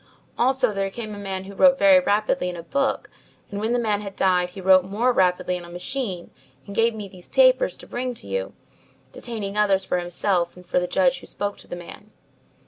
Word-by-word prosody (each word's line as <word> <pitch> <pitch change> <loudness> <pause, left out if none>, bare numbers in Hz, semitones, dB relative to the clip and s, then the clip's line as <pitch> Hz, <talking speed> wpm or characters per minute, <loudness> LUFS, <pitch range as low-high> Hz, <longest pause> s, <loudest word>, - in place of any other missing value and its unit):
Also 255 -2 +2
there 195 -1 -1
came 215 +1 -7
a 205 - -8
man 190 -2 -4
who 195 +1 -10
wrote 270 +6 +5
very 290 -1 +6
rapidly 210 -6 0
in 180 - -6
a 170 - -8
book, 275 +7 -1 0.4
and 200 - -4
when 220 +2 -1
the 245 - +2
man 215 -3 0
had 200 -2 -8
died, 180 -2 +2
he 180 - -11
wrote 185 0 +5
more 220 +7 0
rapidly 180 -2 +1
on - - -11
a 170 - -11
machine 185 0 -4 0.3
and 200 - -9
gave 230 +1 +2
me 210 -2 -6
these 185 -2 -14
papers - - +3
to - - -12
bring 250 0 -4
to - - -10
you, 95 -1 -3 0.6
detaining 210 -4 -5
others 195 -2 +2
for 180 - 0
himself 175 0 0
and 180 0 -14
for 180 - +1
the 180 - -2
judge 270 +4 +2
who - - -13
spoke 205 0 -3
to - - -14
the - - -6
man." 175 +4 -11
200 Hz, 220 wpm, -23 LUFS, 180-240 Hz, 0.6 s, very